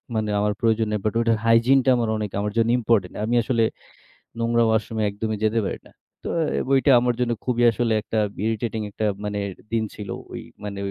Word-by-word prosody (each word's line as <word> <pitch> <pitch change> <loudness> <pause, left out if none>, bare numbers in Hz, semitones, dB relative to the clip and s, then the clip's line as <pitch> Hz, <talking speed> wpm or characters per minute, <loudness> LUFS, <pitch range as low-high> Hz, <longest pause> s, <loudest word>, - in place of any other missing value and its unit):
মানে 110 -1 -1
আমার 105 0 +1
প্রয়োজন 115 -1 +2
নেই। 105 - 0
বাট 110 - +1
ওইটার 115 -1 +2
হাইজিন 115 +4 +5
টা - - +4
আমার 115 -2 0
অনেক 105 -2 -4
আমার 105 0 -2
জন্য 115 0 +3
ইম্পোর্টেন্ট। 110 -5 +1
আমি 120 +2 0
আসলে 115 -2 +1 0.8
নোংরা 115 0 +2
ওয়াশরুমে 110 0 0
একদমই 110 +1 -3
যেতে 110 +1 +2
পারি - - -3
না। - - -21 0.3
তো - - -5
অ্যা 160 - 0
বইটা 135 +1 +4
আমার 125 0 +1
জন্য 120 -1 +1
খুবই 120 -1 +1
আসলে 115 0 0
একটা 110 - -4 0.3
ইরিটেটিং 110 0 -2
একটা 110 +2 -3 0.2
মানে 105 0 -2 0.3
দিন 115 -1 +2
ছিল, 105 -2 -8 0.2
ওই - - -5 0.2
মানে 100 -1 -5
115 Hz, 200 wpm, -23 LUFS, 105-120 Hz, 0.8 s, হাইজিন